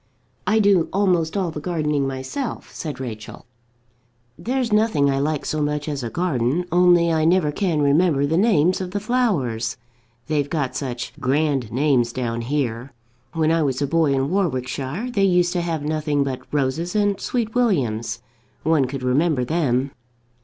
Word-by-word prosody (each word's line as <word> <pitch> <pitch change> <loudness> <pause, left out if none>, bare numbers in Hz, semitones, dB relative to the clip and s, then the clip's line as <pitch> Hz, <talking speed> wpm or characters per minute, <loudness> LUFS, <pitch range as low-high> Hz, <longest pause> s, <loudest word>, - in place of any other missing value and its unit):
"I 215 - +3
do 200 -5 +3
almost 180 -3 +1
all 185 -4 -1
the 155 - -6
gardening 150 -4 -1
myself," 135 - -5
said 150 -5 -6
Rachel. 110 -5 -7 0.9
"There's 240 - -2
nothing 210 -11 +3
I 135 - 0
like 150 +1 -1
so 155 - -1
much 150 0 -1
as 145 -3 -3
a 120 - -4
garden, 155 0 0
only 175 -1 +4
I 160 -1 +1
never 165 -2 +3
can 160 -3 0
remember 145 0 +3
the 155 +3 0
names 185 -3 +3
of 185 - -4
the 205 +3 -3
flowers. 175 - 0 0.5
They've 145 -2 -1
got 145 -6 -2
such 125 -3 -4
grand 135 -3 0
names 130 -3 +2
down 120 -2 -3
here. 125 -1 -2 0.4
When 160 -1 +1
I 165 0 +2
was 135 -4 0
a 145 - +1
boy, 155 0 +2
in 135 +2 0
Warwickshire, 155 - -2
they 200 - 0
used 180 -2 +3
to 175 - 0
have 165 -3 -2
nothing 150 -1 0
but 135 -2 -6
roses 150 +6 -1
and 205 -1 +2
sweetwilliams. 170 - -1 0.4
One 155 -3 +3
could 130 0 -5
remember 130 +1 +1
them." 135 -3 0
150 Hz, 160 wpm, -22 LUFS, 135-180 Hz, 0.9 s, only